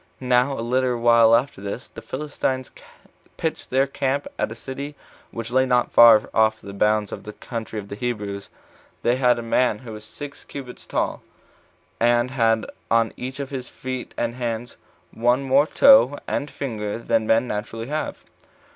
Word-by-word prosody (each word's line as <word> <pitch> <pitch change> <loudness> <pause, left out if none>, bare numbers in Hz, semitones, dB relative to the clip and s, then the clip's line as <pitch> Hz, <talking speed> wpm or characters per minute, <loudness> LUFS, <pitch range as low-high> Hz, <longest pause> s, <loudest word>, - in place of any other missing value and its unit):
Now 125 +1 +2
a 115 - -3
little 125 0 +1
while 115 -1 +6
after 125 -3 -1
this, 100 +6 -5
the - - -11
Philistines 130 -2 -3 0.7
pitched - - -3
their 135 +1 +3
camp 140 0 -1
at - - 0
a - - -6
city 140 +4 -7 0.3
which 115 0 -6
lay 130 +1 +3
not 125 -1 +2
far 115 -2 +7
off 110 0 +3
the 100 - -10
bounds 105 0 +1
of - - -6
the 105 - -8
country 115 -1 -6
of 100 -1 -5
the - - -8
Hebrews. 105 -4 -4 0.5
They 120 +2 +2
had 125 -2 +3
a 120 - -4
man 115 -1 +2
who 115 0 -10
was 105 0 -9
six 140 +6 -9
cubits 130 -3 -9
tall, - - -1 0.8
and 120 +1 +3
had 115 -4 +2 0.2
on 115 -1 +2
each 130 +2 -6
of 140 -1 -5
his 130 -2 -5
feet 130 -1 -6
and 120 0 -1
hands 120 -1 -4 0.4
one 120 +4 +2
more 135 +3 +4
toe 270 - +6
and 145 - -2
finger 110 -8 -4
than 115 -1 0
men 115 +2 +3
naturally 115 +1 -4
have. 150 +4 -4
120 Hz, 175 wpm, -23 LUFS, 110-130 Hz, 0.8 s, far